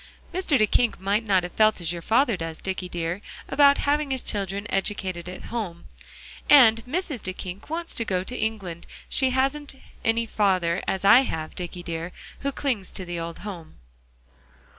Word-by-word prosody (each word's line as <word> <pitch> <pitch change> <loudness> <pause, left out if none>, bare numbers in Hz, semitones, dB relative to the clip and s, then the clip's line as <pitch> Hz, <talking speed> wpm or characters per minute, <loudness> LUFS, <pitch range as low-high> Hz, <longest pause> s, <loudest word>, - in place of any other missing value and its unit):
"Mr. 350 -6 +2
Duyckink 225 +1 +2
might 200 +4 +1
not 195 -4 +3
have 175 - -5
felt 215 +1 +3
as 170 -1 -2
your 170 - -6
father 230 - +3
does, 165 -2 -5
Dicky 190 -1 -4
dear, 175 +2 -3 0.3
about 280 0 +5
having 290 0 +1
his 265 -1 -1
children 200 -1 -2
educated 190 -3 -2
at 185 +5 -9
home; 190 -8 -4 0.6
and 230 -6 +7
Mrs. 300 - -2
Duyckink 185 +2 -6
wants 335 +1 -2
to 230 - -2
go 185 -4 -1
to 250 - -6
England; 200 -7 -3 0.2
she 265 -1 +2
hasn't 270 +2 0 0.3
any 230 0 +2
father, 185 -5 +1
as 190 0 -1
I 215 +5 +9
have, 160 -12 -2
Dicky 175 0 -6
dear, 165 +1 -4 0.3
who 280 - -1
clings 250 -9 -2
to 185 - -5
the 175 -1 -4
old 165 0 -5
home." 175 -6 -8
200 Hz, 170 wpm, -25 LUFS, 180-250 Hz, 0.6 s, I